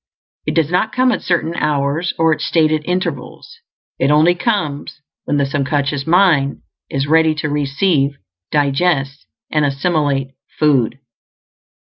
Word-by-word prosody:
It - - -1
does 160 -1 +1
not 200 +5 +1
come 255 0 +3
at 220 - -2
certain 170 -2 -1
hours 150 +2 -1
or 165 -1 +3
at - - -5
stated 155 -2 +1
intervals; 185 - -4 0.4
it 135 - +2
only 155 +4 +4
comes 175 -9 -2 0.3
when 145 - 0
the 140 - +2
sub 135 -1 -2
conscious 140 0 -1
mind 160 -6 +2 0.3
is 135 0 -1
ready 160 +1 +3
to 150 0 -3
receive, 145 0 0 0.3
digest, 140 -1 0 0.2
and 150 -1 +1
assimilate 140 -1 0 0.3
food. 135 -6 +2
150 Hz, 135 wpm, -17 LUFS, 140-170 Hz, 0.4 s, only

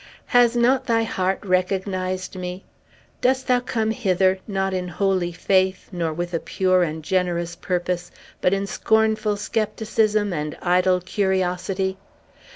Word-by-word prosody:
Has 245 -1 +4
not 255 +2 +3
thy 230 -1 +2
heart 190 -2 -1
recognized 185 0 -1
me? 180 0 -5 0.6
Dost 260 +1 +2
thou 250 -1 +3
come 225 -3 -1
hither, 190 -4 +2
not 195 -2 -1
in 180 -1 -2
holy 185 0 0
faith, 185 +2 +1
nor 170 -3 -2
with 175 +2 -4
a 165 - +1
pure 185 0 +1
and 160 -2 -2
generous 175 -1 -1
purpose, 180 -1 -2 0.3
but 180 - +3
in 195 0 0
scornful 220 0 +1
scepticism 215 -1 0
and 150 -1 -3
idle 180 +1 +2
curiosity? 190 0 -1
190 Hz, 135 wpm, -23 LUFS, 180-215 Hz, 0.6 s, Has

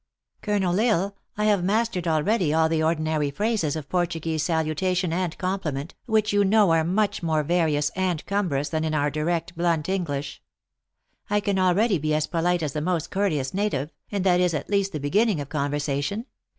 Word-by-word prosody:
Colonel 195 -3 0
L - - +3
Isle, 200 -4 +1 0.2
I 210 - +1
have 205 -4 +3
mastered 200 -2 0
al 155 -2 +2
ready 200 -6 +1
all 160 +1 +3
the 160 0 0
ordinary 155 -2 0
phrases 205 -2 -1
of 155 -3 -5
Portuguese 165 -2 -1
saluta 165 +2 0
tion 180 -3 0
and 175 -2 -2
compliment, 175 -6 -3
which 215 -2 +2
you 205 0 +4
know 200 -2 +4
are 165 -1 +3
much 200 +5 0
more 160 -3 +1
various 155 -2 +1
and 180 -4 -2
cumbrous 175 -9 -1
than 160 -1 -1
in 155 -1 -1
our 145 -1 +1
direct, 165 +4 -2
blunt 170 -2 0
English. 145 -7 -3 0.9
I 210 0 +2
can 200 -2 0
already 185 +2 +3
be 155 +1 0
as 155 0 +1
polite 175 +1 0
as 145 -3 -2
the 150 - -2
most 170 -1 -1
courteous 155 -10 0
native, 185 -8 -1 0.2
and 200 -3 -1
that 180 -2 +4
is, 180 -2 +2
at 150 - -5
least, 200 -1 +1
the 155 - -4
beginning 195 +6 +2
of 140 -1 -6
conversation. 145 - -2
170 Hz, 190 wpm, -25 LUFS, 155-195 Hz, 0.9 s, you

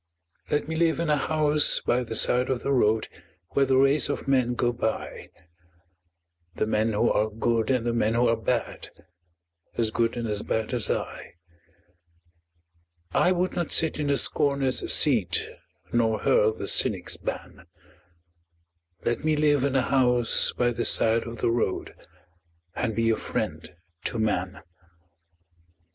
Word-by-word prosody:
Let 150 - -1
me 160 - -4
live 165 0 +1
in 165 -2 0
a - - +4
house 150 0 +1
by 125 +1 0
the 115 -2 -6
side 125 +3 +2
of 130 -2 -2
the 140 - -1
road 110 -4 +2 0.4
Where 140 -1 +1
the 130 0 +3
race 135 +2 +3
of 145 - -4
men 130 -3 +1
go 120 0 0
by 110 -2 -4 1.3
The - - 0
men 110 +1 0
who 110 +3 +2
are 110 +1 +1
good 115 +1 -1
and 125 -3 +1
the 120 - 0
men 115 -1 +1
who 120 +1 +3
are 115 - +3
bad, 115 +1 -3 0.9
As 115 -2 0
good 115 +1 0
and 120 -1 -3
as 105 -1 -1
bad 110 +3 -2
as 120 -3 -1
I. - - -4 1.8
I 180 - +3
would 180 0 0
not 175 -2 -3
sit 160 -1 +2
in 150 - -1
the 140 -1 +2
scorner's 140 -2 +1
seat 110 - +2 0.5
Nor 115 -2 +2
hurl 110 - +3
the 110 - -7
cynic's - - -1
ban - - -7 1.4
Let 120 - -1
me 155 0 +2
live 145 -2 +2
in 140 -1 0
a 130 - +3
house 125 -3 +2
by 120 -1 0
the 120 0 -3
side 115 +1 +3
of 115 -1 -8
the - - +2
road 115 -5 -2 0.8
And 115 -3 -2
be 115 0 +2
a - - +2
friend - - -4 0.4
to - - -2
man. 95 -4 -2
120 Hz, 155 wpm, -25 LUFS, 115-140 Hz, 1.8 s, a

